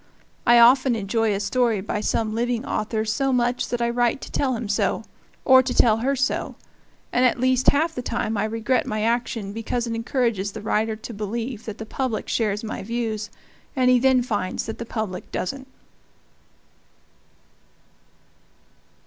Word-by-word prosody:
I 240 Hz, 0 st, +7 dB
often 250 Hz, +1 st, +6 dB
enjoy 220 Hz, +1 st, 0 dB
a -, -, -2 dB
story 230 Hz, +1 st, +1 dB
by 205 Hz, +2 st, -3 dB
some 215 Hz, 0 st, -1 dB
living 240 Hz, +2 st, -1 dB
author 215 Hz, -1 st, -2 dB
so 270 Hz, +5 st, 0 dB
much 245 Hz, -1 st, 0 dB
that 240 Hz, -1 st, -1 dB
I 235 Hz, -, +1 dB
write 240 Hz, +1 st, +1 dB
to -, -, -9 dB
tell 265 Hz, -3 st, 0 dB
him 225 Hz, -1 st, -4 dB
so 205 Hz, -, 0 dB, 0.4 s
or 260 Hz, 0 st, +8 dB
to 260 Hz, -1 st, -3 dB
tell 220 Hz, -2 st, +5 dB
her 265 Hz, +5 st, 0 dB
so; 265 Hz, 0 st, -1 dB, 0.6 s
and 250 Hz, -, +3 dB
at 250 Hz, -1 st, +3 dB
least 255 Hz, 0 st, +4 dB
half 320 Hz, +3 st, +1 dB
the 250 Hz, -, -4 dB
time 235 Hz, -2 st, -2 dB
I 205 Hz, +1 st, 0 dB
regret 225 Hz, +4 st, 0 dB
my 215 Hz, 0 st, -2 dB
action, 230 Hz, -3 st, -1 dB
because 225 Hz, +2 st, -2 dB
it 230 Hz, -, -3 dB
encourages 230 Hz, -4 st, -1 dB
the 215 Hz, -, -7 dB
writer 220 Hz, +1 st, 0 dB
to 225 Hz, +2 st, -9 dB
believe 225 Hz, +3 st, -4 dB
that 215 Hz, -1 st, -6 dB
the 220 Hz, -, -7 dB
public 240 Hz, -1 st, -3 dB
shares 210 Hz, -2 st, 0 dB
my 220 Hz, -, -5 dB
views, 220 Hz, -1 st, -3 dB, 0.5 s
and 255 Hz, -2 st, +4 dB
he 250 Hz, -, +5 dB
then 260 Hz, 0 st, +4 dB
finds 205 Hz, -6 st, -2 dB
that 220 Hz, -, -6 dB
the 235 Hz, -, -6 dB
public 215 Hz, -6 st, -5 dB
doesn't. 265 Hz, +6 st, -4 dB
230 Hz, 170 wpm, -23 LUFS, 215-250 Hz, 0.6 s, or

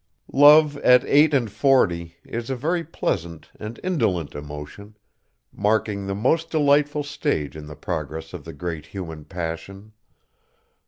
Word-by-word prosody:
Love 145 Hz, +1 st, +7 dB
at 125 Hz, -2 st, +5 dB
eight 150 Hz, +2 st, +5 dB
and 125 Hz, -7 st, +1 dB
forty 90 Hz, -8 st, +2 dB
is 115 Hz, +1 st, -5 dB
a 135 Hz, -, -1 dB
very 165 Hz, +7 st, -1 dB
pleasant 85 Hz, -, -4 dB
and 110 Hz, +2 st, -7 dB
indolent 95 Hz, -, 0 dB
emotion, 75 Hz, +9 st, -9 dB, 0.6 s
marking 105 Hz, -1 st, 0 dB
the 100 Hz, -, -2 dB
most 160 Hz, +10 st, +1 dB
delightful 145 Hz, -1 st, +2 dB
stage 110 Hz, -, -2 dB
in 75 Hz, -1 st, -9 dB
the 75 Hz, -, -9 dB
progress 80 Hz, 0 st, -5 dB
of 85 Hz, -5 st, -7 dB
the 80 Hz, -, -8 dB
great 80 Hz, -4 st, -5 dB
human 80 Hz, -3 st, -7 dB
passion. 95 Hz, +5 st, -7 dB
100 Hz, 140 wpm, -23 LUFS, -, 0.6 s, Love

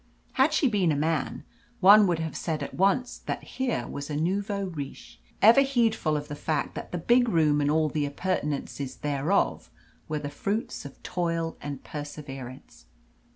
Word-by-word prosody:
Had -, -, +3 dB
she 285 Hz, -, +3 dB
been 200 Hz, -8 st, +2 dB
a -, -, +1 dB
man, 155 Hz, +1 st, -1 dB, 0.4 s
one 200 Hz, +2 st, +8 dB
would 175 Hz, -2 st, +1 dB
have 160 Hz, -1 st, -4 dB
said 160 Hz, -3 st, -2 dB
at -, -, -6 dB
once 200 Hz, +7 st, +1 dB
that -, -, -4 dB
here 250 Hz, -, -2 dB
was 140 Hz, +1 st, -6 dB
a 150 Hz, -, -3 dB
nouveau 200 Hz, +5 st, -1 dB
riche, 145 Hz, -, -8 dB, 0.2 s
ever 230 Hz, +6 st, +8 dB
heedful 230 Hz, -, +1 dB
of 145 Hz, 0 st, -5 dB
the -, -, -6 dB
fact 150 Hz, -1 st, -2 dB
that -, -, -7 dB
the 180 Hz, -, -2 dB
big 240 Hz, +8 st, +3 dB
room 155 Hz, -5 st, +3 dB
and 145 Hz, -, +1 dB
all 155 Hz, +1 st, +3 dB
the 150 Hz, -1 st, -1 dB
appurtenances 145 Hz, -4 st, -3 dB
thereof 145 Hz, +6 st, 0 dB, 0.4 s
were 155 Hz, -, -1 dB
the 145 Hz, -1 st, -5 dB
fruits 205 Hz, -, -3 dB
of 140 Hz, -, -11 dB
toil 165 Hz, -2 st, -2 dB
and 140 Hz, -2 st, -6 dB
perseverance. 135 Hz, -, -8 dB
160 Hz, 170 wpm, -27 LUFS, 145-200 Hz, 0.4 s, one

